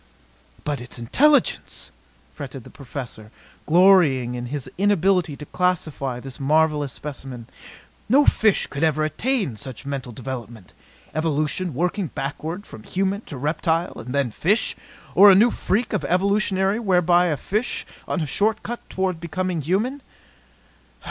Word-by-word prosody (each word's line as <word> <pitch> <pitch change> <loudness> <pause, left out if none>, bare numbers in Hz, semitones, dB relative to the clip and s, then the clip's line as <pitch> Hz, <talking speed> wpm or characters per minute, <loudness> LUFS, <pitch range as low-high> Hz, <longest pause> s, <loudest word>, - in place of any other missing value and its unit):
"But 145 -3 -2
its 120 - -6
intelligence!" 285 - +2 0.4
fretted 135 -3 -8
the - - -14
Professor, 125 -5 -8 0.4
glorying 160 -8 +5
in 120 0 -4
his 140 0 -5
inability 190 -5 +2
to 150 - -8
classify 155 -8 -1
this 135 +2 -9
marvelous 150 0 +2
specimen. 135 -5 -7 0.6
"No 280 +5 +5
fish 215 -3 +3
could 140 +2 -4
ever 155 -1 +2
attain 195 - -1
such 130 +2 -8
mental 135 -3 -4
development. 120 -5 -8 0.4
Evolution 155 +1 -1
working 180 +4 0
backward 155 +7 -5
from 110 - -11
human 195 - -1
to 145 - -7
reptile 160 +4 0
and 125 - -7
then 140 -4 +1
fish 195 - +1 0.4
or 205 +1 +9
a 190 - +8
new 230 +5 +5
freak 220 +5 -1
of 210 - 0
evolution 200 +2 +2 0.3
whereby 180 -2 +4
a 155 -4 0
fish 215 - -1 0.2
on 180 - -1
a - - 0
short 215 - +1
cut 240 0 -4
toward 185 -3 -1
becoming 170 +1 -2
human?" 215 - -1
160 Hz, 140 wpm, -23 LUFS, 135-190 Hz, 0.6 s, or